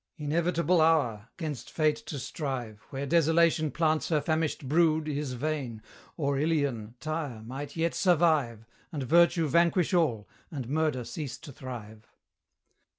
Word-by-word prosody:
Inevitable 170 Hz, +3 st, +1 dB
hour! 125 Hz, -10 st, +2 dB
'Gainst 155 Hz, -7 st, -5 dB
fate 155 Hz, -2 st, +1 dB
to 145 Hz, -, -4 dB
strive 125 Hz, -6 st, -4 dB
Where 135 Hz, 0 st, -4 dB
Desolation 165 Hz, 0 st, +3 dB
plants 155 Hz, +2 st, +1 dB
her 155 Hz, -3 st, +3 dB
famished 155 Hz, -2 st, -1 dB
brood 160 Hz, +1 st, +3 dB
Is 145 Hz, -3 st, -2 dB
vain, 130 Hz, -4 st, -3 dB, 0.4 s
or 140 Hz, -3 st, 0 dB
Ilion, 140 Hz, -8 st, -1 dB
Tyre, 155 Hz, -8 st, -4 dB
might 135 Hz, +5 st, -7 dB
yet 165 Hz, 0 st, 0 dB
survive, 155 Hz, -, +2 dB, 0.3 s
And 145 Hz, -5 st, -3 dB
Virtue 170 Hz, +3 st, +4 dB
vanquish 170 Hz, +3 st, +3 dB
all, 120 Hz, -, +1 dB, 0.2 s
and 135 Hz, -7 st, -5 dB
Murder 150 Hz, -2 st, 0 dB
cease 135 Hz, +3 st, -6 dB
to 160 Hz, -3 st, -11 dB
thrive. 110 Hz, -5 st, -9 dB
150 Hz, 135 wpm, -29 LUFS, 130-165 Hz, 0.4 s, Virtue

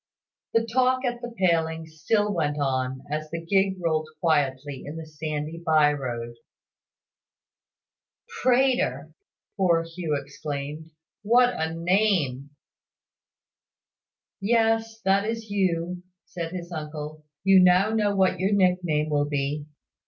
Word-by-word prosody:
The 230 Hz, 0 st, +3 dB
talk 255 Hz, +2 st, +1 dB
at 240 Hz, -1 st, -2 dB
the 240 Hz, -1 st, -6 dB
palings 160 Hz, -3 st, 0 dB
still 210 Hz, +1 st, +2 dB
went 150 Hz, -4 st, -1 dB
on, 130 Hz, -1 st, -1 dB
as 155 Hz, 0 st, -3 dB
the 165 Hz, -, -4 dB
gig 190 Hz, +3 st, +1 dB
rolled 155 Hz, -2 st, -1 dB
quietly 145 Hz, -4 st, 0 dB
in 145 Hz, -, -7 dB
the 160 Hz, -, -7 dB
sandy 155 Hz, +1 st, -5 dB
by 155 Hz, -3 st, +4 dB
road. 120 Hz, -4 st, -5 dB, 2.0 s
"Prater!" 255 Hz, +1 st, +2 dB, 0.4 s
poor 170 Hz, -4 st, +3 dB
Hugh 165 Hz, -3 st, -3 dB
exclaimed. 150 Hz, +2 st, -6 dB, 0.3 s
"What 245 Hz, +4 st, +4 dB
a 160 Hz, 0 st, -2 dB
name!" 170 Hz, -7 st, +1 dB, 1.9 s
"Yes; 225 Hz, +1 st, +1 dB
that 195 Hz, 0 st, +3 dB
is 225 Hz, -2 st, -5 dB
you," 180 Hz, -3 st, 0 dB, 0.2 s
said 165 Hz, -2 st, -5 dB
his 180 Hz, -1 st, -7 dB
uncle. 155 Hz, -1 st, -6 dB, 0.2 s
"You 195 Hz, 0 st, +6 dB
know 185 Hz, +4 st, +5 dB
now 210 Hz, -2 st, +1 dB
what 190 Hz, -1 st, +2 dB
your 190 Hz, +3 st, +1 dB
nick 185 Hz, -2 st, +3 dB
name 155 Hz, -2 st, 0 dB
will 145 Hz, 0 st, +1 dB
be. 145 Hz, +1 st, -2 dB
165 Hz, 125 wpm, -25 LUFS, 150-200 Hz, 2.0 s, You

